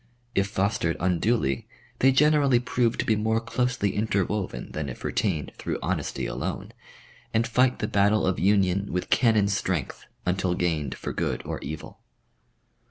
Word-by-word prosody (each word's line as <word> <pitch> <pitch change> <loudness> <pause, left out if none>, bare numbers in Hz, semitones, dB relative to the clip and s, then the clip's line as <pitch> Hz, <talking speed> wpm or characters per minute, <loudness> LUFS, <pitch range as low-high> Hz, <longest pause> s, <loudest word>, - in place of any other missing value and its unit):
If 100 0 +2
fostered 95 -4 0
unduly 90 - +1 0.3
they 135 - +5
generally 145 -1 +4
prove 125 -1 0
to - - -1
be 110 - +3
more 110 +1 +1
closely 125 -2 -1
interwoven 100 - -1
than 75 -2 -4
if 65 - -9
retained 80 -8 -1
through - - -2
honesty - - -2
alone, - - -4 0.6
and 115 +1 +3
fight 125 +2 +2
the 105 - -2
battle 100 +1 +3
of 95 0 0
union 100 0 +2
with 90 - -3
cannon 110 -5 +4
strength 95 -7 -2 0.2
until 90 0 0
gained 80 -6 -1
for - - -5
good - - -2
or - - -4
evil. 75 +1 -7
100 Hz, 150 wpm, -26 LUFS, 90-115 Hz, 0.6 s, they